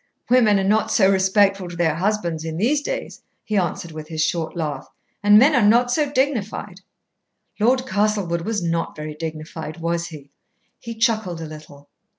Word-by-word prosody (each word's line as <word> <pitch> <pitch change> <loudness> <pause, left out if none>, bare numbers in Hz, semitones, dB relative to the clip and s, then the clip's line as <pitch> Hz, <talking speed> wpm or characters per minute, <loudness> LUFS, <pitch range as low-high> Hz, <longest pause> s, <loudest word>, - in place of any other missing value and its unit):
"Women 220 -5 +5
are - - 0
not 210 +3 +2
so 195 -3 +4
respectful 195 0 +2
to 175 - -8
their 170 -2 +1
husbands 170 -2 -1
in 160 -1 -5
these 265 - +1
days," - - -5 0.2
he 215 - -3
answered, 175 -3 -1
with 155 -1 -8
his 160 -1 0
short 165 -1 -2
laugh. 150 -5 -4 0.3
"And 205 0 +6
men 270 +8 +6
are 255 - +4
not 235 +4 +4
so 290 +1 +1
dignified." 260 -6 -2 0.8
"Lord 255 +4 +2
Castlewood 205 -6 0
was 210 +1 -2
not 165 0 -2
very 150 0 -6
dignified, 155 0 -7
was 170 0 -2
he?" 145 -4 -12 0.5
He 230 -1 -7
chuckled 220 -7 0
a 165 - -5
little. 150 -2 -12
190 Hz, 170 wpm, -22 LUFS, 160-220 Hz, 0.8 s, And